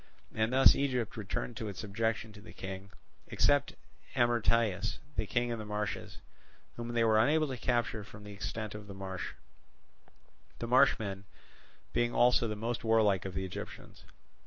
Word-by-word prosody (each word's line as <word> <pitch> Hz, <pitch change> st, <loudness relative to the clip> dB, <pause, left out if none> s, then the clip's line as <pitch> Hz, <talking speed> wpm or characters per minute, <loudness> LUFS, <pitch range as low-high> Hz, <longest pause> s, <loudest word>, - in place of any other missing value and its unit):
And 110 Hz, +1 st, +1 dB
thus 130 Hz, +1 st, +7 dB
Egypt 125 Hz, -5 st, -1 dB
returned 110 Hz, +2 st, -4 dB
to 110 Hz, -, -4 dB
its 100 Hz, -3 st, -6 dB
subjection 110 Hz, +1 st, -2 dB
to 100 Hz, -, -12 dB
the 110 Hz, -, -12 dB
King, 95 Hz, +1 st, -7 dB, 0.4 s
except 145 Hz, 0 st, +2 dB, 0.4 s
Amyrtaeus, 115 Hz, -4 st, +2 dB, 0.2 s
the 110 Hz, -, -1 dB
king 120 Hz, +2 st, 0 dB
in 115 Hz, -1 st, -2 dB
the -, -, -5 dB
marshes, 105 Hz, -1 st, -4 dB, 0.6 s
whom 120 Hz, 0 st, -5 dB
they 115 Hz, -1 st, +3 dB
were 110 Hz, -1 st, +4 dB
unable 155 Hz, +6 st, +4 dB
to 130 Hz, -, -3 dB
capture 120 Hz, -3 st, 0 dB
from 105 Hz, 0 st, -12 dB
the 105 Hz, -, -9 dB
extent 105 Hz, +1 st, -4 dB
of 105 Hz, -1 st, -8 dB
the 100 Hz, -, -8 dB
marsh; 95 Hz, -1 st, -5 dB, 1.2 s
the -, -, -4 dB
marshmen 115 Hz, -6 st, +3 dB, 0.7 s
being 120 Hz, 0 st, +1 dB
also 120 Hz, -1 st, +5 dB
the 105 Hz, -, -3 dB
most 115 Hz, +3 st, -3 dB
warlike 110 Hz, -5 st, +3 dB
of 95 Hz, -, -5 dB
the 95 Hz, -, -1 dB
Egyptians. 95 Hz, -, -8 dB
110 Hz, 160 wpm, -32 LUFS, 100-120 Hz, 1.2 s, thus